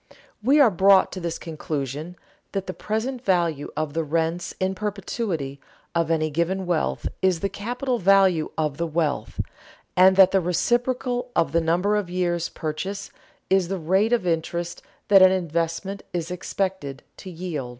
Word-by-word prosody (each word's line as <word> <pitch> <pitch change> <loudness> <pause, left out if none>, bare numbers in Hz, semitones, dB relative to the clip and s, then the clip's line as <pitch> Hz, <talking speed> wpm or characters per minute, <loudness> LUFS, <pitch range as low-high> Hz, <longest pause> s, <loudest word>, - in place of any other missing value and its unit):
We 270 +7 +4
are 260 -6 +6
brought 190 +1 +5
to 185 - -5
this 170 -2 -3
conclusion: 155 0 -5 0.4
that 195 -1 -2
the 185 - -5
present 235 +6 -3
value 170 - +1
of 155 -2 -2
the 165 +1 0
rents 165 +3 -1
in 190 0 0
perpetuity, 195 - -3 0.3
of 165 -2 +1
any 155 -1 +1
given 175 +5 -1
wealth, 175 -3 -1
is 185 -3 +2
the 195 - 0
capital 245 +5 -2
value 190 -4 +4
of 150 -3 -1
the 170 - -1
wealth; 155 -2 -2 0.6
and 185 +1 +6
that 190 -1 +7
the 195 - +3
reciprocal 245 +7 0
of 160 - +2
the 170 +2 +2
number 175 +6 +1
of 200 -4 -2
years' 175 -2 -1
purchase 190 +6 -5 0.4
is 190 -2 +3
the 195 +2 -2
rate 190 +7 +2
of 235 -6 +2
interest 170 0 -2 0.3
that 195 -2 +8
an 185 0 +8
investment 170 +2 -2
is 170 0 -3
expected 180 -6 -3
to 190 - -9
yield. 165 -7 -5
180 Hz, 160 wpm, -24 LUFS, 165-195 Hz, 0.6 s, that